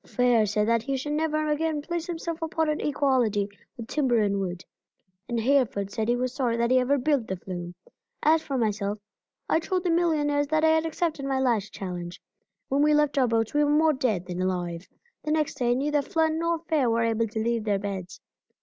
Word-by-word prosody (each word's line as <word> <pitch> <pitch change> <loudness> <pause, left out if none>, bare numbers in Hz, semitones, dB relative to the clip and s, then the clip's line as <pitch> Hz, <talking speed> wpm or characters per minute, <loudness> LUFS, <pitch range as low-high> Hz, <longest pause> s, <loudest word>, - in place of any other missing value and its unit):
Fair 245 -3 +2
said 210 +1 0
that 230 0 +2
he 270 +3 -2
should 295 +3 -4
never 310 0 0
again 305 0 0
place 340 +3 -4
himself 335 -1 -4
upon 320 0 -1
an 305 0 -1
equality 255 -8 +1 0.3
with 230 -2 -7
timber 260 -4 +1
and 200 -2 +1
wood, 180 -2 -4 0.7
and 235 -1 -1
Hereford 225 -6 +1
said 220 +1 -2
he 240 - +3
was 250 0 -2
sorry 245 -4 0
that 235 +1 +1
he 255 - +5
ever 265 +3 +2
built 275 -3 +1
the 190 - -2
flume. 175 -1 -7 0.5
As 315 +1 +4
for 280 -4 -3
myself, 210 -3 -1 0.5
I - - +3
told 360 +2 -2
the 355 - +1
millionaires 295 -4 +1
that 310 +1 +1
I - - +5
had 320 0 +2
accepted 320 -3 -2
my 270 -1 0
last 230 -6 +1
challenge. 175 -2 -6 0.5
When 275 +2 +1
we 300 0 +4
left 295 -1 +2
our 255 - +4
boats 225 -1 0
we 295 0 +3
were 290 - +2
more 310 +1 +4
dead 220 -10 -1
than 180 0 -4
alive. 175 -1 -2 0.4
The - - -4
next 305 -1 0
day 245 -1 +2
neither 290 +2 +1
Flood 320 +3 +1
nor 335 +1 0
Fair 290 -7 +2
were 230 0 +2
able 230 0 +1
to 220 +1 -4
leave 230 0 -1
their 205 -2 +1
beds. 195 -2 -5
255 Hz, 215 wpm, -26 LUFS, 215-305 Hz, 0.7 s, he